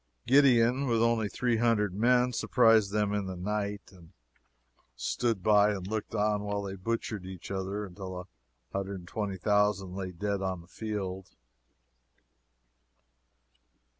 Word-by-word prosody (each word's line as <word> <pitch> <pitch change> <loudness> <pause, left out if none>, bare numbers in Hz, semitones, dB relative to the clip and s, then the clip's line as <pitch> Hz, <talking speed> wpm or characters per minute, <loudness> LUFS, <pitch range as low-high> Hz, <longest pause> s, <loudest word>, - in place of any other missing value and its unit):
Gideon, 130 0 +4
with 115 -2 +2
only 115 -3 +1
three 120 +1 0
hundred 110 -4 +2
men, 125 +4 +3
surprised 115 -5 +4
them 105 -1 0
in 100 -2 -1
the 95 - -5
night, 100 +2 -3
and 85 -4 -17 0.8
stood 115 - -1
by 105 0 +5
and 95 -3 -5
looked 110 +2 -4
on 105 -1 +1
while 100 0 -3
they 95 -1 -5
butchered 110 0 -3
each 95 0 -9
other 100 +2 -3
until 95 -1 -7
a 90 - -14 0.5
hundred 100 0 -2
and 90 -1 -12
twenty 100 0 -3
thousand 105 -1 +1
lay 95 -1 -4
dead 100 +2 -2
on 95 -2 -2
the 85 - -18
field. 95 -3 -5
105 Hz, 140 wpm, -29 LUFS, 95-110 Hz, 0.8 s, by